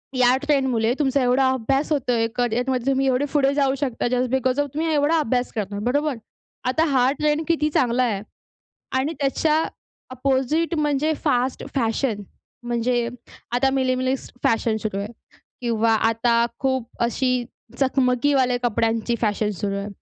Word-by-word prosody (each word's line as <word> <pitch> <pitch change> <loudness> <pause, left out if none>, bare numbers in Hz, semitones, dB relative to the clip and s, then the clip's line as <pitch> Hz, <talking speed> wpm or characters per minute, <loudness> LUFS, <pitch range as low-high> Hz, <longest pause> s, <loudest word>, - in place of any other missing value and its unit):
या 250 0 +4
ट्रेंडमुळे 265 -6 +1
तुमचा 275 -1 +2
एवढा 260 +1 +3
अभ्यास 270 +5 -1
होतोय. 245 -6 +1
करिअरमध्ये 245 +1 0
तुम्ही 270 0 +1
एवढे 260 +2 +2
पुढे 280 -1 +3
जाऊ 275 -2 +2
शकता 250 -4 -1
जस्ट 250 +1 0
बिकोज 260 +1 +1
ऑफ 290 - +1
तुम्ही 320 +1 0
एवढा 295 +3 +3
अभ्यास 250 -3 0
करणार, 205 -2 -3
बरोबर? 285 +2 +1 0.5
आता 290 +6 +2
हा 260 -1 +3
ट्रेंड 300 +1 +1
किती 305 -2 +1
चांगला 255 -3 +2
आहे 205 -5 -1 0.8
आणि 285 +5 -1
त्याच्या 305 +3 +2 0.5
ऑपोजिट 270 +6 0
म्हणजे 295 +1 +1
फास्ट 255 -2 0
फॅशन, 225 -3 0 0.4
म्हणजे 240 0 0 0.5
आता 265 +2 +3
मिनिमलिस्ट 260 -1 -1
फॅशन 225 -1 +2
सुरू 210 -3 -2
आहे 205 +3 -5 0.5
किंवा 230 -2 +1 0.2
आता 235 +1 +2 0.2
खूप 260 -3 -1
अशी 250 +1 0 0.3
चकमकीवाले 260 -1 +2
कपड्यांची 230 0 0
फॅशन 210 -1 0
सुरू 200 -1 -1
आहे 200 +1 -4
255 Hz, 140 wpm, -23 LUFS, 235-275 Hz, 0.8 s, या